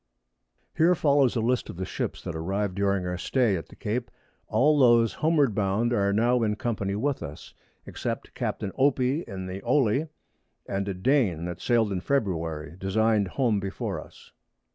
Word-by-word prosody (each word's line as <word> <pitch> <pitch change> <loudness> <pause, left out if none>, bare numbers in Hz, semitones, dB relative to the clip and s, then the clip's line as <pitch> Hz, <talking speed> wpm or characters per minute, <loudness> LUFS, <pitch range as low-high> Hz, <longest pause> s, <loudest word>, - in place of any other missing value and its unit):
Here 170 +3 +4
follows 140 -5 +3
a 115 - +1
List 125 +2 0
of - - -8
the 95 - -3
Ships - - -4
that 90 -3 -5
arrived 95 +4 -2
during 100 -1 0
our 90 0 -3
Stay 120 -4 +1
at 80 - -5
the - - -14
Cape; 115 +3 -3 0.4
all 150 +2 +3
those 120 -3 +5
homeward 150 -6 +2
bound 105 +4 +1
are 100 -3 +2
now 120 +4 +2
in 105 -2 +1
company 105 -3 -2
with 140 +6 -1
us, 75 +3 -9 0.3
except - - -5
Capt. - - -3 0.2
Opie 135 +2 +2
in 95 -1 -6
the 95 +1 -6
Olie, 130 +3 +2 0.6
and 100 0 -3
a 100 - -2
Dane 95 - +1
that 90 -1 -6
sailed 115 -4 +2
in 90 -2 -2
February, 85 - -2
designed 105 +1 +2
home 115 0 +1
before 95 0 -4
us. - - -18
105 Hz, 170 wpm, -26 LUFS, 95-125 Hz, 0.6 s, those